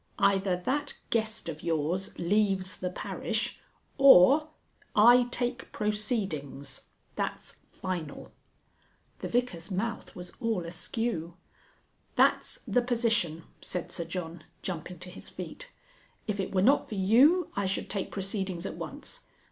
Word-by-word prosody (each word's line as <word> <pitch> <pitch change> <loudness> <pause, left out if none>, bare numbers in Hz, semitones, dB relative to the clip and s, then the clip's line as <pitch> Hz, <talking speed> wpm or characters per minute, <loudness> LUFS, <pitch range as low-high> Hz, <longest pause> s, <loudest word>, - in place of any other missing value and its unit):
"Either 195 -2 +3
that 285 +10 -2
Guest 220 -1 0
of 150 - -5
yours 165 +3 -1
leaves 190 0 +1
the 180 - -2
parish, 180 - -3 0.4
or 275 - +8 0.5
I 240 +3 +7
take 245 0 -2
proceedings. 195 - -2 0.3
That's - - -4
final." 175 -6 -5 0.9
The - - -4
Vicar's 235 -8 -1
mouth 210 +4 -3
was 180 0 -8
all 225 -8 -1
askew. 175 0 -3 0.8
"That's - - +3
the 245 - +2
position," 230 -9 +1 0.2
said 180 -2 -2
Sir 170 - -2
John, 165 -1 -5 0.2
jumping 180 0 -5
to 180 +2 -6
his 180 - -7
feet, - - -7 0.6
"if 205 -2 -2
it 190 - -2
were 185 -1 +2
not 275 +6 +4
for 215 - -4
you, 255 - +5
I 200 -1 0
should 190 - -1
take 195 -2 -2
proceedings 190 -2 -2
at - - -5
once. - - -5
195 Hz, 130 wpm, -29 LUFS, 175-230 Hz, 0.9 s, or